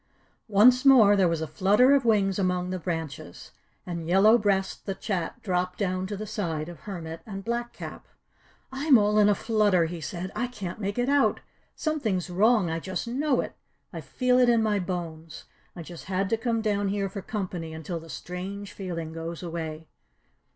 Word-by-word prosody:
Once 235 Hz, +5 st, +5 dB
more 240 Hz, -7 st, +7 dB
there 190 Hz, -3 st, +4 dB
was 165 Hz, -1 st, -1 dB
a 160 Hz, -, -2 dB
flutter 205 Hz, -, +4 dB
of 275 Hz, -3 st, +3 dB
wings 200 Hz, -4 st, +2 dB
among 180 Hz, -1 st, 0 dB
the 185 Hz, -, -3 dB
branches, 160 Hz, -, -6 dB, 0.3 s
and 170 Hz, -2 st, -5 dB
Yellow 195 Hz, +6 st, +6 dB
Breast 200 Hz, -4 st, 0 dB
the 195 Hz, -, -2 dB
Chat 185 Hz, -6 st, -3 dB
dropped 180 Hz, -2 st, -1 dB
down 185 Hz, -2 st, -1 dB
to 205 Hz, 0 st, -5 dB
the 215 Hz, -, -5 dB
side 170 Hz, -7 st, -3 dB
of 175 Hz, -, -10 dB
Hermit 165 Hz, -5 st, -7 dB
and 195 Hz, -4 st, -8 dB
Black 240 Hz, +1 st, -2 dB
Cap. -, -, -9 dB, 0.6 s
"I'm 270 Hz, 0 st, +4 dB
all 210 Hz, 0 st, +3 dB
in 210 Hz, 0 st, +5 dB
a 205 Hz, -, +4 dB
flutter," 205 Hz, -6 st, +2 dB
he 165 Hz, 0 st, -6 dB
said. 175 Hz, +4 st, -5 dB
"I 245 Hz, -, -1 dB
can't 215 Hz, -5 st, -7 dB
make 200 Hz, +2 st, -3 dB
it 245 Hz, 0 st, +1 dB
out. 285 Hz, 0 st, +2 dB, 0.3 s
Something's 220 Hz, -, -1 dB
wrong. 210 Hz, +1 st, +3 dB
I 165 Hz, 0 st, -2 dB
just 185 Hz, +5 st, -4 dB
know 265 Hz, +2 st, +1 dB
it. -, -, -7 dB, 0.4 s
I -, -, -5 dB
feel 250 Hz, -1 st, +1 dB
it 250 Hz, -1 st, +5 dB
in 230 Hz, -2 st, +4 dB
my 210 Hz, -2 st, +1 dB
bones. 165 Hz, -3 st, -5 dB, 0.3 s
I 170 Hz, -, -7 dB
just 170 Hz, 0 st, -10 dB
had 190 Hz, +1 st, -1 dB
to -, -, +4 dB
come 230 Hz, 0 st, -1 dB
down 205 Hz, -2 st, 0 dB
here 200 Hz, 0 st, -1 dB
for 195 Hz, +1 st, -6 dB
company 180 Hz, -6 st, -4 dB
until 160 Hz, +2 st, -5 dB
the 165 Hz, 0 st, -13 dB
strange 195 Hz, +5 st, -6 dB
feeling 165 Hz, -4 st, -5 dB
goes 165 Hz, +1 st, -6 dB
away." 160 Hz, -2 st, -5 dB
195 Hz, 190 wpm, -26 LUFS, 175-220 Hz, 0.6 s, more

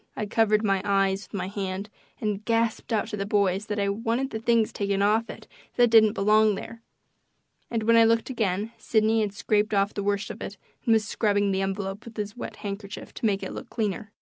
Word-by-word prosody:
I 215 Hz, -, -1 dB
covered 215 Hz, 0 st, +2 dB
my 195 Hz, -2 st, +2 dB
eyes 195 Hz, -1 st, +1 dB
with 200 Hz, -, -6 dB
my 185 Hz, -1 st, -3 dB
hand 195 Hz, 0 st, -4 dB, 0.3 s
and 210 Hz, -1 st, -2 dB
gasped 230 Hz, +1 st, 0 dB
out 220 Hz, 0 st, 0 dB
to 210 Hz, -, -4 dB
the 200 Hz, -, -1 dB
boys 200 Hz, 0 st, +1 dB
that 210 Hz, -, -3 dB
I 200 Hz, -, +1 dB
wanted 230 Hz, +6 st, -1 dB
the 220 Hz, -, -3 dB
things 230 Hz, -1 st, +2 dB
taken 200 Hz, -1 st, 0 dB
off 220 Hz, +3 st, +2 dB
it -, -, -9 dB, 0.3 s
that 240 Hz, -2 st, +4 dB
didn't 220 Hz, -2 st, +6 dB
belong 215 Hz, 0 st, +4 dB
there, 230 Hz, +3 st, -8 dB, 0.9 s
and 230 Hz, -2 st, -1 dB
when 230 Hz, +1 st, +4 dB
I 230 Hz, -, +7 dB
looked 230 Hz, +2 st, +2 dB
again 215 Hz, -2 st, -1 dB
Sidney 220 Hz, 0 st, +2 dB
had 210 Hz, -2 st, -1 dB
scraped 210 Hz, 0 st, +1 dB
off 200 Hz, +1 st, +2 dB
the 205 Hz, -, -3 dB
worst 200 Hz, 0 st, -1 dB
of -, -, -10 dB
it -, -, -6 dB, 0.3 s
and 230 Hz, -, +6 dB
was 220 Hz, -1 st, +3 dB
scrubbing 205 Hz, -3 st, +1 dB
the 190 Hz, 0 st, 0 dB
envelope 195 Hz, +1 st, -3 dB
with 230 Hz, -1 st, -12 dB
his 205 Hz, 0 st, -4 dB
wet 245 Hz, -, -7 dB
handkerchief 200 Hz, +1 st, -6 dB
to 225 Hz, -, -1 dB
make 200 Hz, -2 st, 0 dB
it -, -, -5 dB
look -, -, -8 dB
cleaner. 210 Hz, -2 st, -3 dB
210 Hz, 220 wpm, -26 LUFS, 200-225 Hz, 0.9 s, I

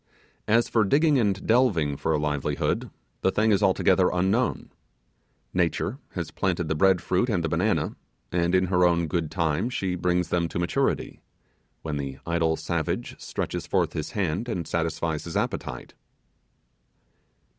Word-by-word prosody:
As 115 Hz, +2 st, +3 dB
for 115 Hz, -, +2 dB
digging 145 Hz, +6 st, +3 dB
and 100 Hz, -4 st, 0 dB
delving 105 Hz, -, +3 dB
for 80 Hz, -, -1 dB
a 80 Hz, -, +2 dB
livelihood, 75 Hz, -2 st, -1 dB, 0.3 s
the -, -, +3 dB
thing 110 Hz, +3 st, +2 dB
is 100 Hz, 0 st, +3 dB
altogether 95 Hz, -1 st, +3 dB
unknown. 95 Hz, +8 st, 0 dB, 0.8 s
Nature -, -, 0 dB
has -, -, -4 dB
planted 90 Hz, -3 st, -1 dB
the 80 Hz, -, 0 dB
bread 90 Hz, +3 st, +3 dB
fruit 95 Hz, +7 st, +1 dB
and 95 Hz, -7 st, 0 dB
the -, -, +1 dB
banana, 90 Hz, +7 st, 0 dB, 0.4 s
and 85 Hz, +1 st, +1 dB
in 95 Hz, 0 st, +3 dB
her 90 Hz, 0 st, +2 dB
own 85 Hz, -1 st, +3 dB
good 80 Hz, 0 st, -1 dB
time 85 Hz, +6 st, 0 dB
she 95 Hz, -7 st, -2 dB
brings 90 Hz, 0 st, 0 dB
them 85 Hz, -1 st, +1 dB
to -, -, -5 dB
maturity, 85 Hz, 0 st, -1 dB, 0.6 s
when 75 Hz, -2 st, -3 dB
the 70 Hz, -1 st, -4 dB
idle 85 Hz, -1 st, +1 dB
savage 80 Hz, 0 st, -3 dB
stretches -, -, -4 dB
forth -, -, +1 dB
his 80 Hz, -, -4 dB
hand, 100 Hz, +2 st, -1 dB
and 90 Hz, -7 st, -3 dB
satisfies 80 Hz, -1 st, -2 dB
his 85 Hz, -, -3 dB
appetite. -, -, -3 dB
90 Hz, 155 wpm, -26 LUFS, 80-100 Hz, 0.8 s, As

